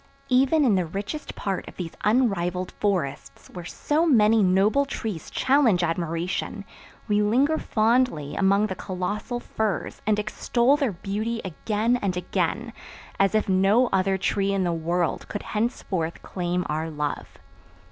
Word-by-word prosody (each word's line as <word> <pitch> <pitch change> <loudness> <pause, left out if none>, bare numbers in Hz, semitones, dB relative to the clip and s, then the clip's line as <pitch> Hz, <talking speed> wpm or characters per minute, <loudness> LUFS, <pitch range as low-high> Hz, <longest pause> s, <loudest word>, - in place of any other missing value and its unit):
Even 270 +4 +4
in 230 - +4
the 185 -2 +2
richest 205 - -5
part 195 -2 -3
of - - -11
these 170 -3 -4
unrivaled 190 -6 +1
forests 185 -10 -3
where 175 -2 -7
so 300 - 0
many 225 -8 +5
noble 195 +8 +3
trees 220 - -5
challenge 255 -10 +3
admiration 170 +4 -2 0.4
we 210 0 +2
linger 265 +9 +2
fondly 220 - +1
among 200 +1 +3
the 205 - -3
colossal 190 +6 -4
firs 220 -4 -3
and 215 -1 +3
extol 235 +5 +1
their 275 -8 0
beauty 210 +6 -3
again 215 +6 0
and 195 -6 -2
again, 180 - -2 0.5
as 195 +2 +3
if 215 - +2
no 195 +6 +3
other 190 0 +2
tree 195 +1 0
in 195 -1 +1
the 175 -1 0
world 170 +1 -1
could 205 - -5
henceforth 205 -7 -2
claim 180 -1 -2
our 155 +2 -2
love. 150 -2 -4
200 Hz, 145 wpm, -25 LUFS, 180-230 Hz, 0.5 s, many